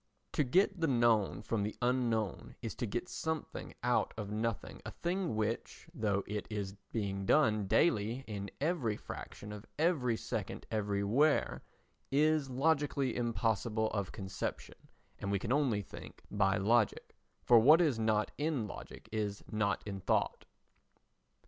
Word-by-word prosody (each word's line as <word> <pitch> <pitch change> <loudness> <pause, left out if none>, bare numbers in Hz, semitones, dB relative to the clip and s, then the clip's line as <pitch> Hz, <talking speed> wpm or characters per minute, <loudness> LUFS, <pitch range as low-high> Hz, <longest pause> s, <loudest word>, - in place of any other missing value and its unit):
To 150 - +2
get 185 +8 +3
the 165 - +3
known 115 -6 +3
from 115 -2 -1
the 105 +1 -2
unknown 120 -4 0
is 115 -5 -4
to 120 - -3
get 120 - -3
something 160 -2 -4
out 125 0 +1
of 105 -2 -4
nothing, 110 0 -3
a - - -5
thing 175 - -2
which, 110 +8 -2
though 105 - 0
it 105 0 -4
is 100 -3 -3 0.2
being 100 -3 -2
done 110 -9 +4
daily 115 - +2
in 100 -2 -5
every 140 -8 0
fraction 105 - -8
of 105 +1 -9
every 145 -8 +2
second - - -4
everywhere, 105 +8 +2 0.5
is 150 0 +3
logically 140 -1 +1
impossible 115 -2 0
of 100 -3 -2
conception, 95 -3 -4 0.5
and 100 - -3
we 100 - +2
can 110 +6 -1
only 130 -8 +2
think 80 - -11
by 95 0 +2
logic, 110 +2 +2 0.3
for 120 -2 +7
what 150 +9 +7
is 150 -9 +2
not 110 -1 +1
in 145 -6 0
logic 105 - -9
is 105 -2 -2
not 105 -2 0
in 100 -2 -4
thought. - - 0
115 Hz, 145 wpm, -34 LUFS, 105-135 Hz, 0.5 s, for